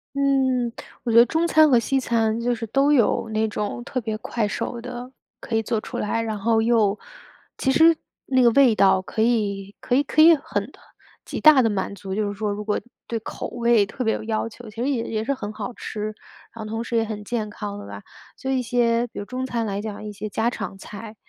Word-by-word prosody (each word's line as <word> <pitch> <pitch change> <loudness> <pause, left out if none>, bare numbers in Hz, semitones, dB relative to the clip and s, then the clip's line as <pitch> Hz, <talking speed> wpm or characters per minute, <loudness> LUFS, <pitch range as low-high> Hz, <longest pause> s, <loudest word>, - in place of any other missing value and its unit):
嗯， 265 -3 +2 0.3
我 240 - -1
觉 225 - +4
得 235 - +9
中 325 +5 0
餐 310 -2 +5
和 245 - +6
西 270 +4 0
餐 230 -3 0
就 245 +1 0
是 230 -1 -5
都 275 +6 +3
有 230 -3 +2
那 220 0 0
种 210 +2 -4
特 255 - -3
别 220 -2 -3
快 220 0 -2
手 235 +3 -4
的 250 +1 -7 0.3
可 230 - -4
以 225 - +1
做 220 0 -1
出 - - -7
来。 230 +2 -1
然 220 -2 -3
后 220 +2 +2
又 220 -3 +2 0.6
其 265 - +1
实 320 +3 +5 0.3
那 260 -1 +3
个 235 - +6
味 255 -2 +5
道 190 -2 +4
可 220 +3 -2
以 205 -4 0
可 245 - 0
以 280 - +4
可 310 - +2
以 330 +1 +9
很 215 -5 -4 0.5
极 - - -5
大 300 -4 +7
地 225 - +3
满 200 -1 -2
足 190 0 -6
就 210 +1 0
是 205 - -3
说 210 0 -1
如 205 +1 -4
果 210 0 0 0.3
对 230 - -2
口 220 - -6
味 235 -3 +2
特 255 +4 -4
别 220 - +2
有 - - -4
要 220 0 -1
求， 230 0 -11
其 215 - -16
实 - - 0
也 260 -5 0
也 220 -1 -2
是 275 +5 0
很 210 -6 -5
好 215 +3 -6
吃， 215 - -6 0.5
然 230 - -7
后 - - -7
同 225 +2 -3
时 235 - -4
也 225 - +3
很 215 -2 -5
健 215 0 -3
康 205 -1 -6
的 205 - -9
吧。 - - -9 0.3
所 265 - -3
以 265 - +1
一 - - 0
些 240 -1 +1
比 - - -15
如 205 - -4
中 255 +4 -4
餐 235 -3 -2
来 200 -1 -3
讲 210 -1 -6
一 210 - -6
些 215 +1 -6
家 220 +3 0
常 195 - -6
菜， 215 +3 -9
230 Hz, 260 characters per minute, -23 LUFS, 215-250 Hz, 0.6 s, 得